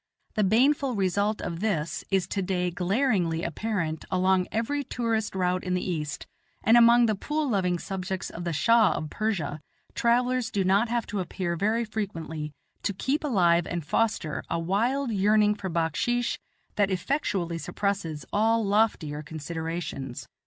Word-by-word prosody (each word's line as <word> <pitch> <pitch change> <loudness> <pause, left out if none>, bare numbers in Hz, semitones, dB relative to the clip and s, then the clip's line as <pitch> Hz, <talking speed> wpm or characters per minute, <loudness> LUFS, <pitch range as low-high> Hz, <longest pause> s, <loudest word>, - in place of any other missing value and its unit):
The 215 - +1
baneful 255 +6 +3
result 200 +2 0
of 170 -1 -4
this 170 -7 -1
is 190 -2 +2
today 180 -2 -1
glaringly 180 -3 +1
apparent 170 -3 -2
along 185 0 +2
every 280 +6 -1
tourist 230 -5 -2
route 180 -1 0
in 185 -1 -1
the 180 0 -1
East; 150 -4 -4 0.4
and, 225 - +5
among 235 0 +7
the 220 - +2
pool 300 +9 -2
loving 185 -6 +1
subjects 190 +1 -4
of 170 - -6
the 170 - -2
Shah 220 +9 +4
of 155 - -4
Persia, 175 -9 -2 0.3
travellers 245 0 +2
do 200 -3 0
not 200 +5 +3
have 235 -1 0
to 205 - -3
appear 180 -1 -2
very 215 +6 +1
frequently 165 -8 -4 0.3
to 200 - -1
keep 275 - -1
alive 175 - +3
and 170 -3 -3
foster 205 -6 0
a 170 - 0
wild 230 +10 0
yearning 210 +1 +4
for 200 -2 -5
backsheesh 175 +9 0 0.4
that 205 -1 +3
effectually 185 - -1
suppresses 190 -6 -2
all 225 +1 +3
loftier 195 -8 +1
considerations. 160 -3 -5
195 Hz, 150 wpm, -27 LUFS, 170-225 Hz, 0.4 s, among